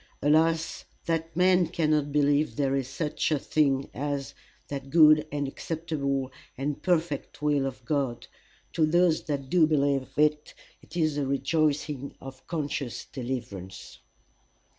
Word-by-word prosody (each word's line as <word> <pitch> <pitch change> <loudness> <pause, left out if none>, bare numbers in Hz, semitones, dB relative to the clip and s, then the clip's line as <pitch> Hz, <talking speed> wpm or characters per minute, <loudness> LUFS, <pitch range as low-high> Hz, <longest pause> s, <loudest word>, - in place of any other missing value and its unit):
Alas 160 +2 +2 0.2
that 165 -1 -2
men 180 0 +4
cannot 150 -3 +1
believe 145 +1 +2
there 135 -2 +1
is 135 -2 -1
such 150 +3 -2
a 155 - +3
thing 140 -2 +1
as 140 0 -3 0.3
"that 135 -1 -6
good 155 -1 +6
and 145 -1 -2
acceptable 140 -3 -3 0.3
and 140 +2 -3
perfect 165 -5 -1
will 145 -2 +2
of 130 -2 -8
God!" 135 -3 -1 0.5
To 160 -2 +3
those 175 0 +3
that 140 -3 -3
do 165 +1 +4
believe 140 -3 +1
it, 150 0 +1 0.3
it 170 - -10
is 155 -3 +1
the 140 -2 0
rejoicing 140 0 0
of 130 -1 -10
a - - -33
conscious 145 -6 -3
deliverance. 110 -8 -6
145 Hz, 140 wpm, -27 LUFS, 135-155 Hz, 0.5 s, good